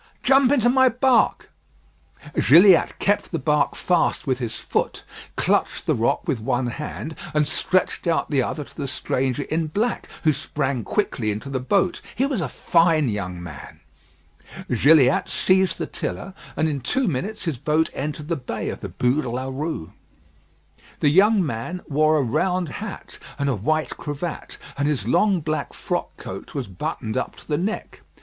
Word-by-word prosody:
"Jump 270 0 +5
into 245 -5 +3
my 260 +1 +5
bark." 250 +1 +2 0.8
Gilliatt 175 +5 +6
kept 205 +1 0
the 165 - -1
bark 150 0 +1
fast 175 -2 +1
with 130 -2 0
his 120 -3 -3
foot, - - -2 0.3
clutched - - +1
the - - +2
rock 115 +9 0
with 140 -8 0
one 120 +3 0
hand, 150 +5 -5 0.2
and 150 -1 +3
stretched 175 +3 0
out 165 -1 +1
the 140 -3 +3
other 150 +4 -3
to - - -18
the 140 -3 -4
stranger 130 0 -1
in 160 +2 -1
black, 215 +10 -1
who 155 -2 +4
sprang 135 -2 -2
quickly 125 - -1
into 105 +6 -4
the 130 - -1
boat. 185 +8 +1
He 265 - +2
was 270 -9 -1
a 145 - -2
fine 165 -4 +3
young 90 -4 -4
man. 75 -5 -10 1.0
Gilliatt 140 +1 +5
seized 190 -1 +2
the - - -2
tiller, 195 - -5 0.2
and 160 - +2
in 145 -3 -2
two 255 - 0
minutes 190 +8 -3
his 155 -8 -2
boat 155 +3 +1
entered 150 +2 -4
the 170 - 0
bay 125 -4 -4
of - - -6
the - - -5
Bû 125 +5 +1
de 125 - -4
la 130 +3 -3
Rue. 145 - -4 1.1
The 145 - +4
young 195 +4 +5
man 145 +8 -4
wore 155 +2 +3
a 145 - +2
round 175 +7 0
hat 205 +6 -8 0.2
and 140 - -1
a 135 - +1
white 155 +10 0
cravat; 150 +3 -5 0.2
and 140 - +2
his 130 -9 -1
long 190 - +3
black 155 0 -3
frock - - -3
coat - - -8
was - - -3
buttoned 110 +5 -4
up 130 - -2
to - - -16
the 150 -1 0
neck. 205 +5 -4
155 Hz, 175 wpm, -23 LUFS, 130-180 Hz, 1.1 s, Gilliatt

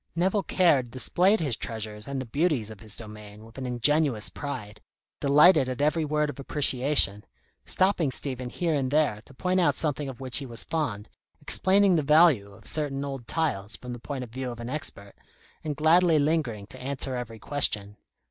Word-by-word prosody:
Nevill 190 +4 +1
Caird 150 -11 +2
displayed 180 - +2
his 140 -7 +1
treasures 110 -2 -6
and 140 -1 -3
the 130 - -4
beauties 140 - 0
of 110 - -11
his 105 -1 -8
domain 105 -1 -11
with 115 +3 -12
an 130 - -4
ingenuous 125 -1 +2
pride, 110 -8 -7 0.4
delighted 145 0 +5
at 130 - -5
every 155 +3 +1
word 150 0 0
of 145 - -15
appreciation, 135 -6 +2 0.4
stopping 185 -6 +2
Stephen 130 -1 -1
here 170 +5 -1
and 135 -3 0
there 145 -8 +1
to - - -13
point 185 +5 0
out 175 - +2
something 145 -2 -2
of 130 - -9
which 130 -2 +1
he 140 - -2
was 120 -1 -3
fond, 125 -11 -3 0.3
explaining 195 0 +3
the - - +2
value 150 -8 +4
of 105 +2 -17
certain 140 -2 -1
old 135 -4 -7
tiles 115 -11 -2
from 125 -1 -8
the 120 - -8
point 135 +1 -5
of 120 - -11
view 130 +1 -4
of 120 -1 -8
an 120 +1 -6
expert, 115 -9 -4 0.5
and 150 -2 -3
gladly 165 +2 +4
lingering 145 -9 0
to 130 +5 -13
answer 130 0 -4
every 115 -2 -6
question. 105 -5 0
135 Hz, 185 wpm, -26 LUFS, 115-155 Hz, 0.5 s, delighted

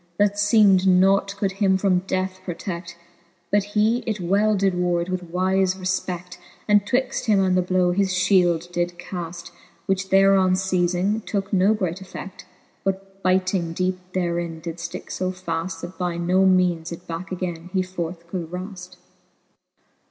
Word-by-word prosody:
That 205 0 +2
feemed 205 -3 +5
nought 195 +2 +4
could 200 -1 0
him 195 -1 +2
from 190 -2 +2
death 185 0 -2
protect:' 175 -1 -6 0.5
But 205 0 +3
he 215 +3 +3
it 215 -2 -1
well 200 +4 +2
did 195 -1 +2
ward 175 0 0
with 185 0 -2
wife 185 +2 +1
refpect, 185 -1 -3 0.3
And 205 -1 +4
twixt 255 +1 0
him 210 -3 +4
and 185 -1 +2
the 185 - +4
blow 180 0 +2
his 195 +1 +1
fhield 180 -2 +2
did 175 0 -2
caflr, 175 -1 -7 0.3
Which 190 0 -1
thereon 195 -1 +5
fei2dng, 185 +2 0
tooke 200 0 -2
no 195 +3 +4
great 185 -4 -2
effe6l:. 190 0 -8 0.5
But 195 0 -4
byting 185 -2 +1
deepe 185 +1 -1
therein 170 -2 -2
did 165 0 -6
fticke 170 -1 -7
fb 185 0 -3
faft, 165 -1 -3
That 175 +2 -8
by 175 -2 -1
no 180 +3 +3
meanes 180 -3 +2
it 170 +1 -8
backe 170 +3 -6
againe 175 -2 -4
he 185 -1 +1
forth 175 -2 -5
could 170 -1 -5
wraft. 180 0 -7
185 Hz, 160 wpm, -23 LUFS, 175-195 Hz, 0.5 s, feemed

